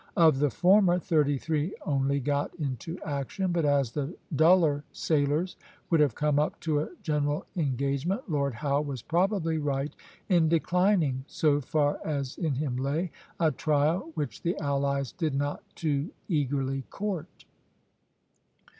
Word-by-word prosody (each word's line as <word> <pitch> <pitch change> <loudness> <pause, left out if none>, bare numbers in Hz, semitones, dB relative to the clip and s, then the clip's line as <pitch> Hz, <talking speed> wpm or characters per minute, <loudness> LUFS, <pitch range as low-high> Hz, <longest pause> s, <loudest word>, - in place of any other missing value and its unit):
Of 160 -5 +5
the 145 0 +3
former, 180 - +4
thirty 150 -5 +2
three 155 +4 -1
only 140 -1 +1
got 145 +1 -1
into 150 +2 -4
action; 150 +6 -2
but 170 -3 +1
as 140 -4 +2
the 145 +6 -3 0.2
duller 160 -2 +4
sailers 155 +3 0 0.3
would 165 - +4
have 145 -6 +3
come 150 -1 +2
up 150 - -1
to 155 -3 +1
a 150 - -2
general 150 -2 0
engagement, 140 - -1
Lord 140 - 0
Howe 140 +2 0
was 140 -5 -5
probably 170 -2 +1
right 145 -1 -2 0.3
in 170 -5 +4
declining, 170 -5 +2
so 145 -2 +2
far 145 +1 +1
as 140 -4 -3
in 160 -6 0
him 135 -2 -2
lay, 150 +6 -1 0.3
a 160 -2 +3
trial 155 +4 +1
which 145 -9 -4
the 175 +2 -1
allies 140 -3 0
did 155 -4 -2
not 145 +1 -1
too 150 -1 -1 0.2
eagerly 135 -4 0
court. 190 -5 -5
150 Hz, 145 wpm, -28 LUFS, 140-165 Hz, 0.3 s, Of